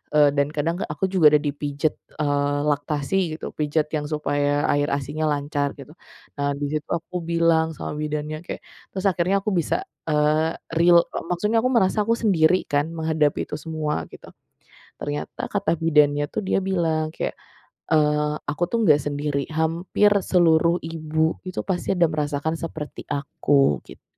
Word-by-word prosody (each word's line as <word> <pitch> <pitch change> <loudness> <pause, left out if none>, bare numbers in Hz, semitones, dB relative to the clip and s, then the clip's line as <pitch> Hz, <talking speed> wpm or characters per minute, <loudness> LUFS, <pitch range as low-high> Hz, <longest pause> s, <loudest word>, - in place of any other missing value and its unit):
Eee, 145 -1 +6
dan 140 0 +2
kadang 160 +3 0
aku 150 +4 -2
juga 155 -6 +6
udah 150 - +3
dipijat, 145 +1 -1 0.3
eee, 145 -1 +1
laktasi 145 +3 -1 0.2
gitu, - - -8
pijat 150 0 0
yang 150 -1 -2
supaya 145 -1 0
air 145 0 +1
asinya 145 +3 -3
lancar 145 -1 -1
gitu. 140 +2 -11 0.5
Nah, 140 0 +1
di 145 +1 -3
situ 150 - -3
aku 170 +2 -13
bilang 165 -1 +2
sama - - -5
bidannya, 150 0 -3
kayak - - -6 0.3
terus 190 0 -4
akhirnya 180 +2 +1
aku 215 - -1
bisa, 175 -4 +1 0.3
eee, 155 +1 +2 0.2
real, 170 0 +7
eee, - - -6
maksudnya 210 +6 +1
aku 255 - +1
merasa 220 -5 +2
aku 230 - +3
sendiri 185 -6 +3
kan 145 0 +1
menghadapi 160 -2 +1
itu - - -5
semua 150 - -3
gitu. - - -13 0.7
Ternyata 145 0 -4
kata 205 0 +1
bidannya 150 -2 +3
tuh - - -1
dia 190 - 0
bilang 165 -5 0
kayak, - - -4 0.5
eee, 150 -1 +2 0.2
aku 160 - -5
tuh 235 - +1
nggak 150 -6 +5
sendiri, 145 0 -2 0.2
hampir 170 +6 +2
seluruh 170 -2 +3
ibu 160 0 -1
itu 185 - -3
pasti 190 0 -1
ada 175 - +4
merasakan 150 +1 -1
seperti 155 -2 -6
aku 140 - +1
gitu. - - -14
155 Hz, 160 wpm, -23 LUFS, 145-170 Hz, 0.7 s, real